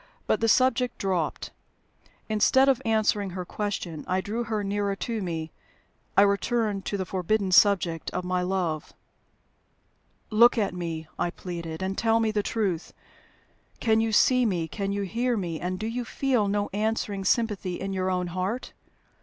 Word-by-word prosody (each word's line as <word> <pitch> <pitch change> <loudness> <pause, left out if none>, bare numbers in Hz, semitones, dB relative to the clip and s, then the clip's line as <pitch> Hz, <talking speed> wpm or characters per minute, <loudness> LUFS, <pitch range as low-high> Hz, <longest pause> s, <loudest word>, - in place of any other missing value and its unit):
But - - +1
the 225 - +3
subject 250 +1 +3
dropped. 185 -5 -2 0.8
Instead 245 +5 +4
of 265 -2 +3
answering 215 -3 +1
her 180 0 -5
question, 180 -6 -4
I 185 +1 +1
drew 225 +5 -3
her 215 -2 -2
nearer 200 0 -1
to 225 +1 -3
me 165 -3 -4 0.7
I 200 - +8
returned 205 0 0
to 200 - -2
the 190 - -2
forbidden 190 +2 0
subject 180 -4 +4
of 180 - -3
my 180 0 0
love. 180 -4 -2 1.4
"Look 235 +3 +6
at 205 -4 +1
me," 165 -3 -4
I - - +1
pleaded, 170 -2 -6
"and 190 +1 -2
tell 225 +1 +2
me 220 -1 +1
the 210 -1 +1
truth. 200 -6 -2 0.9
Can 220 -1 +3
you 225 0 0
see 255 +4 +4
me, 180 -8 0
can 200 +2 -3
you 200 0 -1
hear 235 +5 0
me, 170 -5 -3
and 180 +1 -3
do 215 - -4
you 240 +2 -2
feel 245 -2 0
no 205 0 -1
answering 210 -1 -1
sympathy 205 -5 0
in 195 0 -3
your 185 0 -1
own 180 -1 0
heart? 185 +7 -3
200 Hz, 165 wpm, -26 LUFS, 180-225 Hz, 1.4 s, I